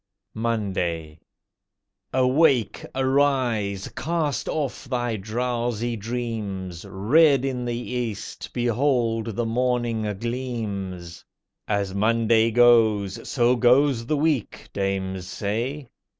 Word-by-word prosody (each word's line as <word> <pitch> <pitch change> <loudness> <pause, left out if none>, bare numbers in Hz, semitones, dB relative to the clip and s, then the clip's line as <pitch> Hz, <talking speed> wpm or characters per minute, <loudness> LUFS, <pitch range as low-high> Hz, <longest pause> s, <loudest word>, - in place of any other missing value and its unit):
MONDAY 95 -9 -2 0.9
Awake! 130 - +3
arise! 130 -7 +1
Cast 160 -3 -1
off 145 -2 -3
thy 120 -3 -1
drowsy 120 +2 -2
dreams! 105 -6 -4
Red 135 +7 +4
in 125 -2 -2
the 120 -1 -2
East, 120 -3 -4
behold 120 -2 +1
the 120 - -1
Morning 120 -2 0
gleams. 100 -8 -4 0.4
"As 100 -2 -1
Monday 115 +2 +3
goes, 110 -4 +3
so 120 -1 +3
goes 125 0 +3
the 155 - +1
week," 145 -6 -1
dames 95 -2 -2
say. 115 +9 -3
115 Hz, 95 wpm, -24 LUFS, 105-125 Hz, 0.9 s, Red